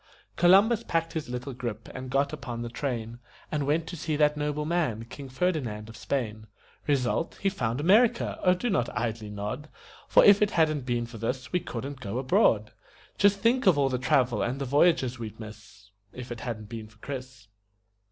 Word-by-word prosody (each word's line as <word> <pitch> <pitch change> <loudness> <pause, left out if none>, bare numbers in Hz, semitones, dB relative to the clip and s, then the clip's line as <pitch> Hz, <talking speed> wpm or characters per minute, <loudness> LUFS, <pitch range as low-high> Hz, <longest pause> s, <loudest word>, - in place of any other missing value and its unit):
Columbus 200 +6 +5
packed 165 -3 -1
his 155 -5 -4
little 125 +2 -5
grip 120 -3 -5
and 130 0 -6
got 140 +3 +1
upon 125 -6 -5
the 120 - -5
train 120 -3 -4 0.3
And 145 -2 -1
went 155 +3 +1
to 175 - -7
see 160 -1 -2
that 150 0 +3
noble 150 0 -2
man, 150 -10 -1
King 135 +3 -9
Ferdinand 130 -9 -2
of 115 - -11
Spain. 110 -3 -3 0.4
Result: 140 +3 0
He 195 - +1
found 125 - -2
America 210 +10 +3
oh, 180 0 +4
do 235 +6 -2
not 125 -11 +1
idly 110 -1 -2
nod, 105 +9 -5 0.4
For - - +6
if 205 0 +7
it 210 - +4
hadn't 155 -5 +2
been 120 -1 0
for 115 -1 -10
this 125 +3 -3
we 180 - +3
couldn't 135 -1 -6
go 105 +1 -4
abroad! 115 -5 +2 0.5
Just 200 0 +4
think 240 +1 +2
of 175 -6 +6
all 140 -1 +3
the 125 -1 -1
travel 125 -3 +2
and 125 +3 -1
the 140 - -2
voyages 135 -3 +2
we'd 110 -2 -7
miss 105 -2 -12 0.2
If 125 -1 -9
it 120 - -5
hadn't 110 -3 -5
been 115 -2 -7
for 105 -1 -22
Chris. 130 -2 -8
130 Hz, 190 wpm, -27 LUFS, 115-155 Hz, 0.5 s, if